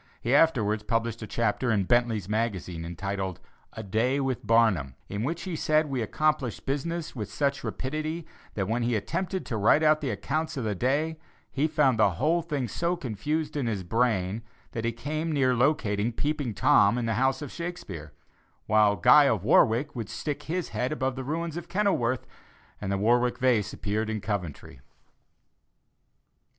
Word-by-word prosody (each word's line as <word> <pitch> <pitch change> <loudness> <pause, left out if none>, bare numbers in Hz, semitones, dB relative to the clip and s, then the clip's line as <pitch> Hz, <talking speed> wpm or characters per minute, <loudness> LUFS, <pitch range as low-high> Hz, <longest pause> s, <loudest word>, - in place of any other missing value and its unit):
He 120 - -1
afterwards 115 -9 +3
published 115 +1 -1
a 110 - -5
chapter 115 +3 0
in 105 -3 +2
Bentley's 115 -2 +1
Magazine 100 -6 -2
entitled 95 +2 -4 0.3
"A 110 - -6
Day 115 +7 +1
with 135 -3 -2
Barnum," 100 - +3
in 100 +1 -3
which 165 +6 -2
he 185 -3 -4
said 155 0 +2
we 130 -3 -1
accomplished 150 +1 -1
business 155 +4 -3
with 105 -4 -5
such 140 -1 -1
rapidity, 155 +4 -3 0.3
that 95 -3 -1
when 115 +3 0
he 120 0 +1
attempted 185 - -2
to 115 - -3
write 110 +9 +4
out 155 0 +4
the 140 - -2
accounts 155 +9 -2
of 130 - -2
the 110 -1 -1
day, 145 - 0 0.3
he 145 +3 +1
found 150 -7 +2
the 100 -3 +4
whole 160 - +1
thing 145 -6 -2
so 170 - -1
confused 150 - -3
in 140 -5 -1
his 105 -4 -2
brain 110 -1 0 0.3
that 115 -1 -4
he 115 - +1
came 155 +7 -3
near 135 -4 +2
locating 120 -5 +1
"Peeping 145 -3 -2
Tom" 100 +2 +4
in 120 - -1
the 115 - 0
house 130 +5 +1
of 145 - -7
Shakespeare, 100 - -6 0.5
while 105 -1 +4
Guy 145 - +7
of 110 -9 +1
Warwick 120 +7 +3
would 115 -5 -5
stick 145 -1 -4
his 175 0 -2
head 125 +1 -2
above 130 -4 -1
the 130 - -5
ruins 165 +4 -3
of 175 - -7
Kenilworth, 155 - +1 0.6
and 100 -1 -3
the 100 - +1
Warwick 120 +4 +2
Vase 115 -5 +2
appeared 110 +1 -2
in 110 -1 -2
Coventry. 90 - -5
120 Hz, 175 wpm, -27 LUFS, 105-150 Hz, 0.6 s, Guy